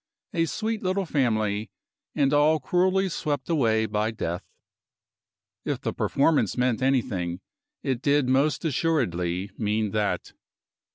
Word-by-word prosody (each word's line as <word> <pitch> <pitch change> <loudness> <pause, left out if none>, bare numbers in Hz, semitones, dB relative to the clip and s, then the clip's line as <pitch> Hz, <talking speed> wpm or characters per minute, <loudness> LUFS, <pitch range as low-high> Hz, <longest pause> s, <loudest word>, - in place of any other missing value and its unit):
A 165 -1 +2
sweet 220 +5 -2
little 190 +1 0
family, 110 - 0 0.5
and 140 -1 +2
all 150 +2 +4
cruelly 185 +6 +2
swept 150 -4 -2
away 110 -8 +2
by 105 +1 0
death. 90 -6 -3 1.2
If - - -2
the - - -2
performance 145 0 +1
meant 125 -1 +1
anything, 110 -10 0 0.4
it 130 -4 -1
did 145 -1 +2
most 140 +6 +2
assuredly 100 - 0
mean 105 -1 0
that. 105 -1 -1
130 Hz, 120 wpm, -26 LUFS, 110-155 Hz, 1.2 s, all